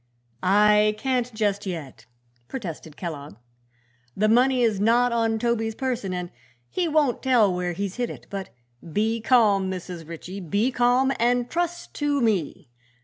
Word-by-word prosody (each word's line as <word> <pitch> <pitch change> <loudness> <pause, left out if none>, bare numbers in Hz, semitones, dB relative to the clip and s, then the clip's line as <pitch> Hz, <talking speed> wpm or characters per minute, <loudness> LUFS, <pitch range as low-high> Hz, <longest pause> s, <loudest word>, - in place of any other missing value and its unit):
"I 210 +2 +4
can't, 250 0 -1
just 205 -2 -1
yet," 140 - -7 0.4
protested 165 - -7
Kellogg. 150 - -6 0.8
"The 215 - +3
money 250 +3 +4
is 220 -4 +2
not 240 +4 +3
on 225 -1 +1
Toby's 225 -1 -1
person 245 -7 -2
and 180 -1 -4 0.4
he 360 -2 -1
won't 295 -5 +1
tell 235 -7 +3
where 180 0 -2
he's 195 +3 -4
hid 245 -1 -1
it. - - -9
But 195 -1 -5 0.4
be 220 +3 0
calm, 210 -6 +3
Mrs. 180 -3 -6
Ritchie; 175 +4 -7
be 200 - 0
calm 245 +2 +3
and 245 +1 +1
trust 345 +1 -3
to 290 -1 +1
me. 190 - -1
215 Hz, 145 wpm, -24 LUFS, 190-245 Hz, 0.8 s, I